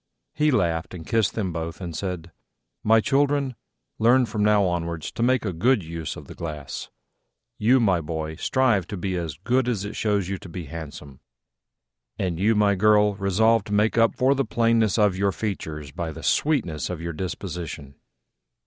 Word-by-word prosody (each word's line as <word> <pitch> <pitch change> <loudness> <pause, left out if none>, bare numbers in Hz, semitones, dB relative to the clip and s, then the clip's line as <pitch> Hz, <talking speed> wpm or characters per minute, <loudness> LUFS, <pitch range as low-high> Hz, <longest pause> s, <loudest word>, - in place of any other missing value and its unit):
He 150 0 +2
laughed 85 - 0
and 80 -2 -9
kissed 110 -3 +1
them 95 -6 -2
both, 80 0 -5
and 85 -4 -6
said, 90 -1 -4 0.5
"My 110 +1 +5
children, 140 +1 +1 0.5
learn 120 +3 +5
from 105 -2 -2
now 105 -1 +4
onwards 85 -3 -2
to - - -6
make 125 -1 +2
a 95 - -1
good 110 +5 +2
use 80 -1 -5
of - - -10
the - - -10
glass. 75 -4 -6 0.7
You, 120 +5 +4
my 95 -7 +2
boy, 80 0 -4
strive 120 -10 +2
to 100 - -5
be 95 +1 -2
as 80 -5 -4
good 125 +2 +2
as 105 -5 -1
it 105 - -6
shows 100 -4 0
you 95 -1 -3
to 90 - -11
be 85 0 -6
handsome; 75 -3 -9 1.0
and 90 -3 -2
you, 110 +4 +3
my 105 -1 +4
girl, 105 +1 +4
resolve 100 +3 +2
to 105 - -5
make 105 +2 +2
up 115 -2 +3
for 130 +2 +3
the 135 0 0
plainness 115 -2 +2
of 105 -4 +3
your 100 0 +2
features 80 -8 -5
by 85 -1 -4
the 80 +1 -9
sweetness 110 - +1
of 90 -3 -4
your 85 0 -4
disposition." 85 -5 -5
100 Hz, 185 wpm, -24 LUFS, 85-115 Hz, 1.0 s, My